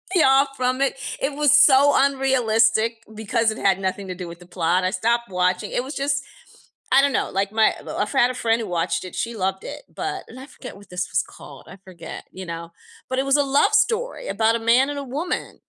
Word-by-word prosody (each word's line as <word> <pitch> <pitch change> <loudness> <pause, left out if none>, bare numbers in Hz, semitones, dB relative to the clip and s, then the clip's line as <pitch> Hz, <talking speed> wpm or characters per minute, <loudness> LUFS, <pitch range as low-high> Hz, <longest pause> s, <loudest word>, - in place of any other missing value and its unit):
me 340 - +5
off 270 +1 +4
from 255 +1 0
it. 275 - +1 0.3
It 275 +2 -1
was 295 0 +4
so 285 0 +6
unrealistic 230 -4 +2
because 220 +1 0
it - - -7
had 195 -1 +2
nothing 190 +1 -3
to 185 - -5
do 180 -1 -7
with 170 +1 -10
the 175 - -16
plot. 175 0 0
I 185 - +1
stopped 235 +4 0
watching, 180 0 0
it 245 - -1
was 275 +3 -7
just 280 +1 -1 0.7
I 270 +1 +6
don't 280 -2 +2
know. - - 0
Like, 195 +1 -1
my 220 0 +3 0.2
I've 210 - -1
had 255 -2 +3
a - - -6
friend 230 -2 0
who 225 - -4
watched 175 0 -1
it. 185 - -9
She 235 0 -3
loved 190 -1 -2
it, - - -8
but - - -4
and 255 - -12
I 265 - -9
forget 255 -4 -11
what 200 - -17
this 180 0 -3
was 165 - +2
called, 140 -3 -14
I - - -10
forget, 170 -3 -9
you 185 0 -8
know? 170 0 -7 0.4
But 260 0 -1
it 270 - 0
was 275 +1 +3
a 285 - +3
love 275 +1 +2
story 455 +3 0
about 220 +3 +1
a - - -1
man 240 +4 +3
and 290 - -4
a - - -5
woman. 295 +7 -4
230 Hz, 235 wpm, -22 LUFS, 190-270 Hz, 0.7 s, so